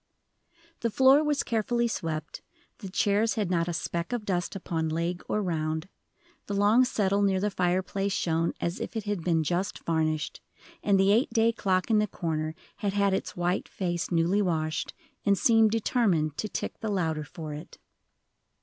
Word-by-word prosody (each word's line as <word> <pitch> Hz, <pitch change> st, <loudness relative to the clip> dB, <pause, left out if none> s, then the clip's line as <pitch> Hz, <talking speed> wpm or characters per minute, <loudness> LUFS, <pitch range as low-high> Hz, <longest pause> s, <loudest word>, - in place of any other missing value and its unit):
The 230 Hz, -, 0 dB
floor 265 Hz, +6 st, +5 dB
was 295 Hz, -1 st, +1 dB
carefully 235 Hz, +1 st, 0 dB
swept, 160 Hz, -8 st, -4 dB, 0.4 s
the 195 Hz, -, -7 dB
chairs 205 Hz, +4 st, +2 dB
had 205 Hz, -5 st, -1 dB
not 170 Hz, -1 st, +1 dB
a 175 Hz, -, -2 dB
speck 170 Hz, +2 st, -3 dB
of 240 Hz, -4 st, -2 dB
dust 180 Hz, -1 st, -1 dB
upon 165 Hz, -4 st, -2 dB
leg 170 Hz, +3 st, -2 dB
or 210 Hz, -, 0 dB
round, 160 Hz, -1 st, -2 dB, 0.6 s
the 205 Hz, -, -2 dB
long 210 Hz, +5 st, +5 dB
settle 200 Hz, -5 st, +1 dB
near 195 Hz, -2 st, +2 dB
the 205 Hz, +2 st, 0 dB
fireplace 185 Hz, +2 st, 0 dB
shone 165 Hz, -3 st, 0 dB
as 170 Hz, +2 st, -2 dB
if -, -, -5 dB
it 220 Hz, -, -2 dB
had 205 Hz, -4 st, -3 dB
been 165 Hz, -2 st, +2 dB
just 175 Hz, +5 st, -1 dB
varnished, 155 Hz, -2 st, -1 dB, 0.4 s
and 200 Hz, -2 st, +3 dB
the 195 Hz, +1 st, +4 dB
eight 230 Hz, +5 st, +3 dB
day 230 Hz, 0 st, +3 dB
clock 190 Hz, -2 st, 0 dB
in 215 Hz, -, +5 dB
the 210 Hz, -, +1 dB
corner 155 Hz, -3 st, -3 dB, 0.2 s
had 200 Hz, -2 st, -1 dB
had 200 Hz, -1 st, +2 dB
its 190 Hz, -, -3 dB
white 175 Hz, +2 st, -1 dB
face 175 Hz, -3 st, -2 dB
newly 175 Hz, +4 st, +2 dB
washed, 155 Hz, -5 st, -1 dB, 0.3 s
and 200 Hz, -1 st, +3 dB
seemed 225 Hz, 0 st, +5 dB
determined 205 Hz, -, +1 dB
to 215 Hz, -, -3 dB
tick -, -, -4 dB
the 220 Hz, -, -3 dB
louder 160 Hz, -6 st, 0 dB
for 155 Hz, 0 st, -7 dB
it. 150 Hz, -, -9 dB
190 Hz, 175 wpm, -28 LUFS, 165-210 Hz, 0.6 s, floor